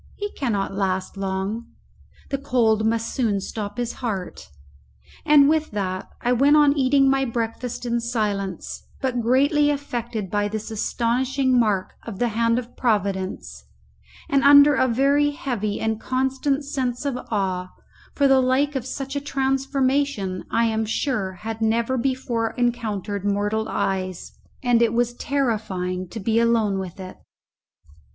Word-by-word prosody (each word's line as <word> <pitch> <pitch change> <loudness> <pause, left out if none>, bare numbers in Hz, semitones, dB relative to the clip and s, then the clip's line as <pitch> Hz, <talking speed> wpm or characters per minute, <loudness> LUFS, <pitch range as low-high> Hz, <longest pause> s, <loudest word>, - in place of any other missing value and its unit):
He 410 0 -4
cannot 205 -8 -2
last 190 -1 -2
long; 195 +4 -3 0.6
the 275 - -1
cold 225 -5 +2
must 230 0 -1
soon 220 -7 +1
stop 205 +2 -5
his 240 -1 -2
heart. 200 -7 -4 0.8
And 290 -2 +7
with 310 0 +2
that 185 -2 -3
I 245 - +1
went 280 +5 +5
on 295 -1 +5
eating 275 0 +3
my 270 0 +3
breakfast 235 0 -3
in 235 0 0
silence, 210 -6 -3 0.2
but 255 -2 -1
greatly 285 +5 +3
affected 240 -8 -3
by 205 0 +1
this 215 +1 -5
astonishing 255 +4 +1
mark 205 -5 0
of 225 -5 -8
the 240 +3 +1
hand 230 +1 +1
of 245 -1 -5
Providence, 200 -5 -2 0.6
and 275 -1 +2
under 285 +1 +8
a 260 -1 +2
very 280 +4 +3
heavy 245 - -3
and 220 0 -1
constant 265 +2 0
sense 255 -2 -2
of 280 -3 -1
awe, 185 -4 -1 0.5
for 280 - +4
the 270 -1 +5
like 270 +3 +1
of 260 -1 -3
such 270 +1 -5
a 285 - -1
transformation 270 -6 0
I 230 0 +2
am 220 -1 0
sure 220 -3 -1
had 220 +4 -6
never 230 +3 +1
before 245 -3 -1
encountered 215 -5 -1
mortal 205 +2 0
eyes, 185 -2 -2 0.3
and 245 -2 +3
it 230 -1 +3
was 240 0 +1
terrifying 210 -10 -2
to 220 - -7
be 225 +3 +1
alone 225 -4 +2
with 185 0 -7
it. 185 -1 -8
235 Hz, 145 wpm, -23 LUFS, 205-270 Hz, 0.8 s, under